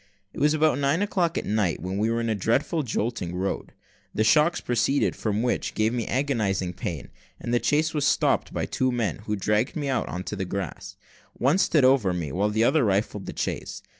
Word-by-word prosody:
It - - -7
was 150 +1 +3
about 155 -3 +2
nine 145 +7 +2
o'clock 175 -4 0
at - - -2
night, 105 -6 0
when 95 +4 -4
we 110 +2 +1
were 115 0 0
in 115 - -1
a - - +2
dreadful 120 - 0
jolting 110 - -3
road, 95 +2 -3 0.4
the 110 - +2
shocks 155 +9 +4
proceeding 125 +4 +1
from 110 0 -2
which 125 - -1
gave 110 +2 +1
me 120 -3 -2
agonising 105 -10 0
pain, 85 -5 -5 0.3
that 120 - -5
the 120 - +2
chaise 155 +2 +1
was 150 -2 0
stopped 145 - +2
by - - -2
two 130 0 0
men, 115 -9 -1
who 105 - 0
dragged 105 +5 0
me 145 -3 -2
out 130 - 0
on 90 - -4
the 100 -2 -3
grass. 100 +1 -5 0.4
One 145 +9 +2
stood 155 -7 +3
over 130 -8 +4
me, 85 -5 -3
while 100 +6 +1
the 110 +2 +1
other 150 +4 +3
rifled 100 -1 0
the - - -7
chaise. - - -4
115 Hz, 210 wpm, -25 LUFS, 100-140 Hz, 0.4 s, shocks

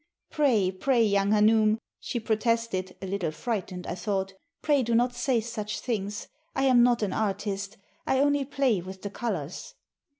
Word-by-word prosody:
*'Pray! 230 -11 +2
pray! 235 +6 +2
young 200 -2 +2
hanoum," 215 +1 +4 0.2
she 240 - -3
protested, 225 -3 -1
a - - -2
little 190 -3 -2
frightened, 185 +2 -4
I - - -3
thought, 190 +1 -2 0.3
"pray 290 -3 +3
do 235 -1 0
not 245 +1 +3
say 245 0 +1
such 215 -2 -4
things. 210 -3 -3 0.3
I 270 - +1
am 255 -3 +5
not 240 -2 +3
an 200 - -1
artist. 205 0 -2 0.3
I 265 - +2
only 285 +1 +3
play 260 -8 +1
with 190 +1 -10
the 200 - -4
colors." 185 - -4
215 Hz, 165 wpm, -27 LUFS, 195-240 Hz, 0.3 s, am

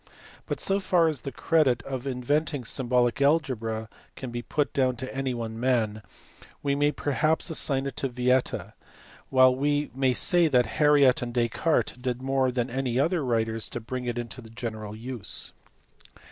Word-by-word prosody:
But - - -3
so 195 +1 +1
far 180 -3 +3
as 150 -5 -4
the 135 - -5
credit 135 -8 +2
of 130 0 -5
in 125 -2 -3
venting 145 -1 0
symbolic 125 +3 +1
algebra 120 -7 +1 0.3
can 130 -2 -6
be 120 0 -4
put 145 +4 -1
down 130 -3 +2
to 130 +2 -6
any 135 -2 -1
one 115 -1 -5
man 115 -4 +1 0.6
we 140 -1 +1
may 145 +1 +2
perhaps 155 +4 0
assign 140 -4 0
it 140 - -4
to 135 - -1
Vieta, 125 +1 0 0.6
while 130 -1 +5
we 145 +2 0
may 130 -1 +1
say 175 +4 +3
that 125 -5 +3 0.2
Harriot 145 -4 +5
and 120 0 -5
Descartes 125 +6 +1
did 125 -1 -2
more 135 0 +1
than 120 0 -2
any 130 -1 -1
other 165 +2 +1
writers 115 -3 -1
to - - -5
bring 125 +2 -5
it 120 -1 -2
into 120 +2 -6
general 110 -2 -6
use. 110 -5 -3
130 Hz, 170 wpm, -27 LUFS, 120-140 Hz, 0.6 s, while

